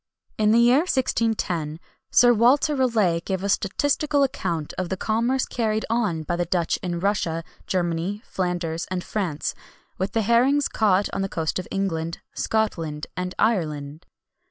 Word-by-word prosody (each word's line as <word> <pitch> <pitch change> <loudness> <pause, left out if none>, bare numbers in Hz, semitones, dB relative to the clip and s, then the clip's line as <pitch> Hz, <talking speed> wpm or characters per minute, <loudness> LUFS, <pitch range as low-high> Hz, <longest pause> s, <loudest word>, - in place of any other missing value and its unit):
In 210 -1 +4
the 225 - +5
year 240 +2 +6
1610, 225 - 0 0.3
Sir 245 0 +6
Walter 260 +6 +4
Raleigh 220 -10 +2
gave 190 -1 -3
a 200 - -1
statistical 285 +8 +1
account 170 - -2
of 185 -2 -2
the 190 - -2
commerce 235 +6 +1
carried 220 -2 -1
on 205 -9 0
by 175 - -2
the 175 - 0
Dutch 170 -1 0
in 175 -2 -3
Russia, 170 -4 0 0.2
Germany, 180 +3 -1
Flanders, 175 -3 -2
and 185 -1 -2
France, 175 -8 -2 0.5
with 190 +2 -2
the 225 - +1
herrings 255 +6 +3
caught 200 -2 +2
on - - -1
the 195 - -1
coasts 160 0 -2
of 180 - -6
England, 165 -4 -2 0.2
Scotland, 165 -9 -1
and 180 0 -4
Ireland. 155 -8 -1
195 Hz, 155 wpm, -24 LUFS, 170-230 Hz, 0.5 s, year